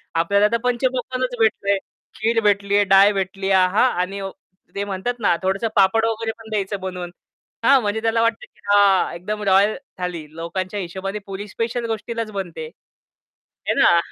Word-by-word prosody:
आपल्याला 200 +5 +3
तर 235 - +2
पंचपक्वान्नच 255 0 -1
भेटलय, 200 -2 +2 0.4
खीर 225 +2 +1
भेटली 200 -1 +2
आहे, 205 - +5
डाळ 195 +1 +6
भेटली 195 0 -2
आहे 190 -1 +5
आहा! 195 +7 +3 0.2
आणि 195 +2 -3 0.5
ते 200 - -1
म्हणतात 200 +5 -2
ना, 200 -5 +3
थोडंसं 195 +4 0
पापड 205 +3 +4
वगैरे 225 0 -1
पण 225 -1 -12
द्यायचं 200 -2 -2
बनवून. 180 -2 -5 0.5
हां, 275 -1 +6
म्हणजे 215 0 -1
त्याला 225 0 +1
वाटतं 230 0 0
की - - -31
हा 200 -2 +4
एकदम 210 +5 -5
रॉयल 200 +2 +4 0.2
थाली 180 -3 -4
लोकांच्या 185 +4 -4
हिशोबाने 195 +3 -5
पूरी 195 +1 -6
स्पेशल 230 +3 -3
गोष्टीलाच 225 0 -4
बनते. 170 -6 -5 1.0
है - - +3
ना. 170 -1 +5
200 Hz, 160 wpm, -21 LUFS, 190-225 Hz, 1.0 s, डाळ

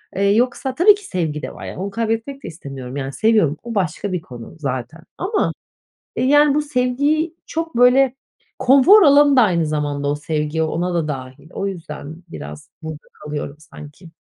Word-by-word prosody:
Eee, 195 - 0
yoksa 255 +2 0
tabii 400 +7 +6
ki 410 - -13
sevgi 160 -5 -2
de - - -6
var. - - -9
Yani, - - -7
onu 190 +3 -3
kaybetmek 230 +5 -3
de - - -6
istemiyorum, 135 -5 -8
yani, 135 0 -4
seviyorum. 210 -9 +2
O 235 -1 -6
başka 190 +1 -1
bir 180 -3 -2
konu 120 +2 -11
zaten 135 +2 -4 0.2
ama, 405 +4 0 0.6
eee, - - 0
yani, 290 +1 +5
bu 300 - +2
sevgiyi 290 +4 0
çok, 325 -3 -4
böyle, 250 +2 +5 0.4
konfor 275 - +6
alanı 285 -2 +6
da 250 - +7
aynı 170 -6 +2
zamanda 145 -2 -2
o 145 - +1
sevgi 150 +1 -2
ona 175 +3 -1
da 160 -3 0
dâhil. 135 +2 -7
O 195 - -3
yüzden 160 -4 -7
biraz 75 - -9
burada 155 -1 -8
kalıyorum 150 -1 -6
sanki. 155 +2 -13
180 Hz, 175 wpm, -20 LUFS, -, 0.6 s, da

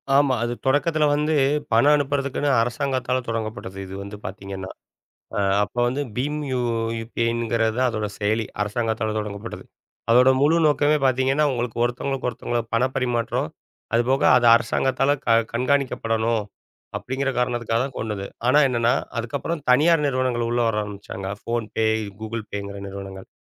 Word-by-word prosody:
ஆமா. 140 -1 +4
அது 120 - -1
தொடக்கத்துல 150 +3 +2
வந்து 150 +2 0 0.4
பணம் 140 +6 +5
அனுப்புறதுக்குன்னு 145 0 -1
அரசாங்கத்தால 130 +1 -1
தொடங்கப்பட்டது, 110 -4 -4
இது 95 0 -8
வந்து 100 +1 -8
பாத்தீங்கன்னா. 95 0 -6 0.7
அ - - +1 0.2
அப்ப 105 - -7
வந்து 130 +4 -1 0.2
பிம் 150 +4 -1
யு 130 - 0 0.4
UPIங்கறதா 115 0 0
அதோட 110 -2 -2
செயலி, 110 +2 0 0.2
அரசாங்கத்தால 110 0 -1
தொடங்கப்பட்டது. 105 -1 -6 0.5
அதோட 125 +2 +6
முழு 150 +4 +4
நோக்கமே 150 0 +3
பாத்தீங்கன்னா 130 +3 +2
உங்களுக்கு 120 -2 -3
ஒருத்தங்களுக்கொருத்தங்களோ 120 -1 -2
பணப் 125 +3 +1
பரிமாற்றம், 120 -3 -1 0.4
அது 115 - +4
போக 135 +1 +2
அது 120 - +3
அரசாங்கத்தால 130 +4 +1
க - - -2 0.2
கண்காணிக்கப்படணும் 115 -4 0 0.5
அப்படிங்கற 135 +2 -2
காரணத்துக்காகதான் 120 +1 -1
கொண்டது. 105 -3 -3 0.2
ஆனா 135 +4 +5
என்னன்னா, 120 -1 +2 0.2
அதுக்கப்புறம் 140 +7 -3
தனியார் 150 +5 +5
நிறுவனங்கள் 130 -3 0
உள்ள 120 0 +1
வர 115 - 0
ஆரம்பிச்சாங்க, 100 -2 -7 0.2
PhonePe, 115 -1 -1 0.4
Google 110 0 -4
Payங்கர 100 0 -5
நிறுவனங்கள். 95 -1 -8
120 Hz, 130 wpm, -23 LUFS, 110-135 Hz, 0.7 s, அதோட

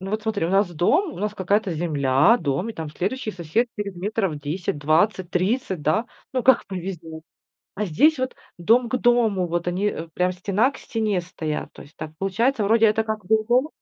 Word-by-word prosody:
Ну, 190 +1 -6
вот 215 +1 -2
смотри, 210 -6 -1
у - - -3
нас 195 -1 +3
дом, 300 - +2
у - - -10
нас 210 +2 -2
какая-то 200 +1 0
земля, 150 - +3
дом, 160 +8 -1
и - - -7
там 160 -7 -6
следующий 210 - -3
сосед 185 +7 -1
через 200 -2 -3
метров 195 -2 -2
10, 150 +2 -3
20, 170 +5 +1
30, 190 - -1
да. 215 +11 +1 0.3
Ну, 255 -1 0
как 260 -1 +4
повезёт. 170 -4 -6 0.5
А 210 - -2
здесь 280 - +3
вот 260 0 -2 0.2
дом 230 +8 +3
к 255 - 0
дому. 230 -7 +2
Вот 170 +1 -2
они, 185 +4 -1
э, 165 -5 -5
прям 180 0 +1
стена 200 +7 +1
к 275 - -12
стене 215 -5 -1
стоят. 160 -3 -5
То - - -12
есть 145 - -18
так 155 0 -6
получается, 220 +5 +1
вроде 225 +2 +4
это 220 +1 +2
как 215 -3 -4
бы 220 - +4
и - - -17
дом. 250 +5 +3
195 Hz, 210 wpm, -23 LUFS, 170-225 Hz, 0.5 s, как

